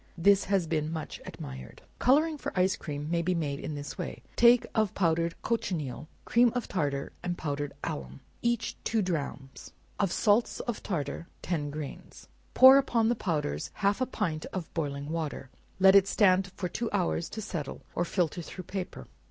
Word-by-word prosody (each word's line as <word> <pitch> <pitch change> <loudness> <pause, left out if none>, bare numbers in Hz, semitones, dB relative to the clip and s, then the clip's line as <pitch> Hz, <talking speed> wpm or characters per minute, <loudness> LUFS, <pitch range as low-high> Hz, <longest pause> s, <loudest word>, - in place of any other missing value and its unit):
This 200 +3 +4
has 195 -3 +1
been 155 -1 -1
much 160 -2 -5
admired. 65 -1 -9 0.2
Coloring 305 +5 +4
for - - -4
ice 185 +1 +3
cream, 145 -1 -5
may 170 -1 +2
be 180 +2 0
made 145 -4 -2
in 155 - -5
this 145 0 -7
way: - - -5
take 240 0 +6
of 215 -4 +1
powdered 165 -2 +1
cochineal, 160 - -2 0.2
cream 240 0 +4
of 245 - -2
tartar 140 -6 -1
and 175 0 -3
powdered 145 -1 -3
alum, 65 -1 -5 0.2
each 235 -1 0
two 225 -2 +1
drachms; 140 -6 -4 0.3
of 195 -3 +1
salts 215 +5 +2
of 240 -3 -4
tartar, 170 -2 -3 0.2
ten 155 -5 -1
grains; 145 -1 -8 0.3
pour 265 +1 +10
upon 230 -4 +2
the 240 - +2
powders 150 - -2
half 200 +4 +1
a 255 - +2
pint 165 -11 -2
of 185 -4 -5
boiling 145 -2 -3
water; 155 -5 -4 0.3
let 190 0 +7
it 195 -1 +7
stand 195 -2 +3
for 180 - -2
two 230 +6 -3
hours 175 -4 0
to 220 - -6
settle, 170 -10 -5
or 175 - 0
filter 175 -1 -1
through 185 +3 -8
paper. 180 - -5
175 Hz, 175 wpm, -29 LUFS, 150-205 Hz, 0.3 s, pour